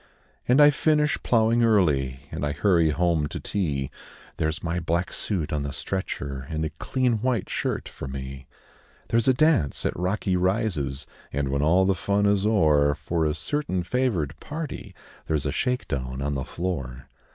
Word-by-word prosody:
And 125 Hz, +3 st, +5 dB
I 145 Hz, 0 st, +8 dB
finish 150 Hz, 0 st, +2 dB
ploughing 115 Hz, 0 st, +3 dB
early, 70 Hz, -, +2 dB
And -, -, -4 dB
I 75 Hz, 0 st, 0 dB
hurry 85 Hz, 0 st, +3 dB
home 80 Hz, -1 st, +1 dB
to -, -, -6 dB
tea 70 Hz, -9 st, -2 dB, 0.5 s
There's 80 Hz, 0 st, -1 dB
my 85 Hz, +1 st, -1 dB
black 85 Hz, +2 st, -1 dB
suit 90 Hz, -9 st, -2 dB
on 75 Hz, -, 0 dB
the 70 Hz, 0 st, -3 dB
stretcher, 70 Hz, -6 st, -4 dB
And 80 Hz, -1 st, -2 dB
a 80 Hz, -, -3 dB
clean 120 Hz, -, 0 dB
white 125 Hz, -5 st, 0 dB
shirt -, -, -2 dB
for -, -, -8 dB
me; 65 Hz, 0 st, -7 dB, 0.6 s
There's 115 Hz, +1 st, +2 dB
a 130 Hz, -, +6 dB
dance 150 Hz, -, +2 dB
at -, -, 0 dB
Rocky 95 Hz, +1 st, 0 dB
Rises, 90 Hz, -, 0 dB, 0.3 s
And, 70 Hz, 0 st, -1 dB
when 70 Hz, +1 st, 0 dB
all 90 Hz, +5 st, +4 dB
the 95 Hz, -, +3 dB
fun 100 Hz, +3 st, 0 dB
is 100 Hz, 0 st, +3 dB
o'er, 75 Hz, -8 st, +4 dB
For 80 Hz, +2 st, -1 dB
a 75 Hz, -, -1 dB
certain 95 Hz, -, -2 dB
favoured 90 Hz, -, 0 dB
party 155 Hz, 0 st, -6 dB, 0.3 s
There's 75 Hz, -3 st, 0 dB
a 70 Hz, -, 0 dB
shake 125 Hz, -, -1 dB
down 65 Hz, -1 st, -3 dB
on 70 Hz, +1 st, -1 dB
the 65 Hz, -1 st, -3 dB
floor. 65 Hz, -9 st, -4 dB
85 Hz, 175 wpm, -25 LUFS, 70-105 Hz, 0.6 s, I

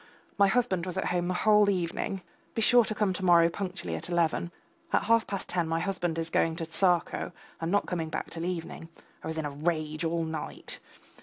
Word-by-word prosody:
My 200 Hz, 0 st, +5 dB
husband 195 Hz, -5 st, +1 dB
was 185 Hz, 0 st, -4 dB
at -, -, 0 dB
home 175 Hz, -1 st, 0 dB
the 180 Hz, -, -1 dB
whole 210 Hz, +1 st, +5 dB
evening. 185 Hz, 0 st, -2 dB, 0.3 s
Be 225 Hz, -, 0 dB
sure 245 Hz, +1 st, +7 dB
to 215 Hz, -, -3 dB
come 205 Hz, -2 st, +1 dB
to 190 Hz, -, -5 dB
morrow 170 Hz, -2 st, +6 dB
punctually 185 Hz, 0 st, -4 dB
at -, -, -6 dB
eleven. 170 Hz, 0 st, +1 dB, 0.4 s
At -, -, +2 dB
half 230 Hz, 0 st, +3 dB
past 200 Hz, -2 st, -4 dB
ten 175 Hz, -2 st, 0 dB
my 165 Hz, 0 st, 0 dB
husband 175 Hz, -2 st, -2 dB
is 165 Hz, 0 st, -3 dB
going 165 Hz, 0 st, +2 dB
to 165 Hz, -1 st, -4 dB
Tsarskoe 175 Hz, +2 st, +1 dB, 0.3 s
and 165 Hz, +1 st, -2 dB
not 205 Hz, -, +2 dB
coming 165 Hz, -3 st, -3 dB
back 160 Hz, -, -4 dB
till 165 Hz, 0 st, -4 dB
evening. 165 Hz, -2 st, -5 dB, 0.3 s
I -, -, -5 dB
was 160 Hz, 0 st, -4 dB
in 160 Hz, -, -2 dB
a 145 Hz, -, -3 dB
rage 155 Hz, +1 st, -2 dB
all 165 Hz, 0 st, 0 dB
night. 160 Hz, -1 st, -6 dB
175 Hz, 215 wpm, -29 LUFS, 165-195 Hz, 0.4 s, sure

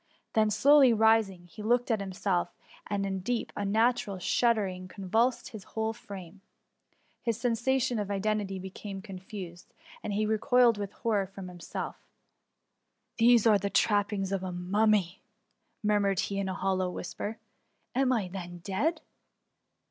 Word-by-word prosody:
Then 215 Hz, -1 st, +3 dB
slowly 275 Hz, +2 st, +6 dB
rising, 220 Hz, -5 st, +3 dB
he 175 Hz, +5 st, -11 dB
looked 240 Hz, +3 st, +1 dB
at 220 Hz, -, +2 dB
himself, 190 Hz, -2 st, -1 dB, 0.3 s
and 200 Hz, -1 st, -1 dB
a 195 Hz, -, -2 dB
deep, 195 Hz, +5 st, -2 dB
unnatural 210 Hz, 0 st, +1 dB
shuddering 190 Hz, -2 st, +1 dB
convulsed 225 Hz, +8 st, 0 dB
his 215 Hz, -6 st, -9 dB
whole 220 Hz, +2 st, -2 dB
frame. 195 Hz, -3 st, -10 dB, 0.8 s
His 230 Hz, -2 st, -1 dB
sensations 245 Hz, 0 st, +1 dB
of 205 Hz, -, -5 dB
identity 200 Hz, -1 st, -1 dB
be 190 Hz, 0 st, -7 dB
came 195 Hz, -1 st, -7 dB
confused, 185 Hz, -3 st, -9 dB, 0.3 s
and 210 Hz, -, -4 dB
he 215 Hz, +2 st, +1 dB
recoiled 230 Hz, +1 st, +3 dB
with 200 Hz, -1 st, -4 dB
horror 210 Hz, -4 st, 0 dB
from 195 Hz, -1 st, -9 dB
himself: 175 Hz, -1 st, -6 dB
^^ -, -, -33 dB, 1.2 s
These 235 Hz, -1 st, +5 dB
are 215 Hz, -3 st, +6 dB
the 200 Hz, +1 st, -2 dB
trappings 205 Hz, -2 st, +1 dB
of 195 Hz, -1 st, -1 dB
a 185 Hz, -1 st, -4 dB
mummy 190 Hz, +1 st, +1 dB, 0.3 s
!"' -, -, -47 dB
murmured 205 Hz, -2 st, +2 dB
he 200 Hz, 0 st, -2 dB
in 195 Hz, -1 st, -1 dB
a 185 Hz, -, -3 dB
hollow 190 Hz, -1 st, 0 dB
whisper. 205 Hz, +5 st, -5 dB, 0.6 s
Am 265 Hz, 0 st, +2 dB
I 220 Hz, -7 st, +1 dB
then 175 Hz, -1 st, -7 dB
dead 295 Hz, -, -1 dB
205 Hz, 150 wpm, -29 LUFS, 190-225 Hz, 1.2 s, slowly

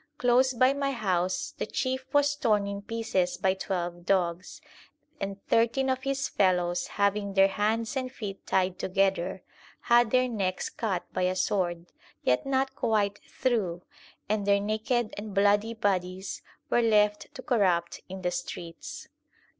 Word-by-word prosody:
Close 250 Hz, +1 st, +4 dB
by 255 Hz, +2 st, +4 dB
my 280 Hz, 0 st, -1 dB
house 185 Hz, -7 st, -1 dB
the -, -, -1 dB
chief 260 Hz, 0 st, -2 dB
was 290 Hz, 0 st, +3 dB
torn 220 Hz, -8 st, +2 dB
in 200 Hz, 0 st, -4 dB
pieces 205 Hz, -4 st, -1 dB
by 190 Hz, -1 st, +2 dB
twelve 175 Hz, -2 st, -3 dB
dogs; 180 Hz, -1 st, 0 dB, 0.6 s
and 195 Hz, 0 st, -4 dB
thirteen 250 Hz, +4 st, +2 dB
of 260 Hz, 0 st, -1 dB
his 275 Hz, 0 st, -1 dB
fellows, 180 Hz, -2 st, +1 dB
having 200 Hz, -1 st, +1 dB
their 195 Hz, 0 st, +6 dB
hands 220 Hz, +5 st, 0 dB
and 255 Hz, -1 st, -2 dB
feet 205 Hz, -6 st, -7 dB
tied 185 Hz, -1 st, +1 dB
together, 190 Hz, -1 st, 0 dB, 0.4 s
had 240 Hz, -1 st, +4 dB
their 255 Hz, +1 st, +3 dB
necks 195 Hz, -6 st, -2 dB
cut 195 Hz, -6 st, -2 dB
by 185 Hz, -, -1 dB
a 185 Hz, 0 st, +1 dB
sword, 175 Hz, -3 st, 0 dB, 0.4 s
yet 125 Hz, -, +1 dB
not 270 Hz, 0 st, +1 dB
quite 210 Hz, -4 st, 0 dB
through, 200 Hz, -9 st, -1 dB, 0.4 s
and 205 Hz, -1 st, -1 dB
their 200 Hz, 0 st, +4 dB
naked 215 Hz, +3 st, -1 dB
and 205 Hz, -1 st, -7 dB
bloody 205 Hz, +3 st, +3 dB
bodies 190 Hz, -2 st, -2 dB, 0.3 s
were 240 Hz, -, +4 dB
left 210 Hz, -2 st, +2 dB
to 255 Hz, -, -8 dB
corrupt 185 Hz, -, +1 dB
in 190 Hz, 0 st, -7 dB
the 180 Hz, -, +1 dB
streets. 170 Hz, -10 st, -6 dB
205 Hz, 150 wpm, -28 LUFS, 185-240 Hz, 0.6 s, their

